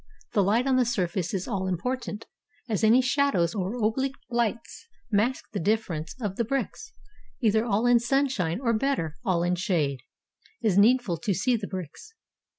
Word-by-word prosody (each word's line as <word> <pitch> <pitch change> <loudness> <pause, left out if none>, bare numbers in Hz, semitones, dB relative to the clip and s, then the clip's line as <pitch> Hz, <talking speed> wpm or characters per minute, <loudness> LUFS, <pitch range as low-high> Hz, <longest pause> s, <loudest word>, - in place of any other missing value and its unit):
The 205 - +4
Kght 220 +6 +2
on 265 -1 +3
the 255 - +4
surface 185 -6 -1
is 190 -2 -3
all 195 -5 -2
important, 220 +4 -3 0.4
as 220 -2 -1
any 230 +4 +6
shadows 250 - +2
or 195 +2 -2
oblique 265 +5 0 0.2
Ughts 235 - -2 0.2
mask 225 +5 +1
the 205 - -1
differences 185 -2 -1
of 205 -5 -3
the 235 - +1
bricks; 275 - -3 0.5
either 220 -2 +3
all 220 0 0
in 245 -1 +5
sun 270 +4 +2
shine, 180 -9 -2
or 235 -3 +1
better, 215 - -1
all 175 -3 +1
in 175 +1 +1
shade, 170 - 0 0.6
is 215 -5 +1
needful 215 -3 +4
to 190 +4 -1
see 240 +7 +2
the 210 -3 -4
bricks. 185 - -8
215 Hz, 170 wpm, -26 LUFS, 185-245 Hz, 0.6 s, any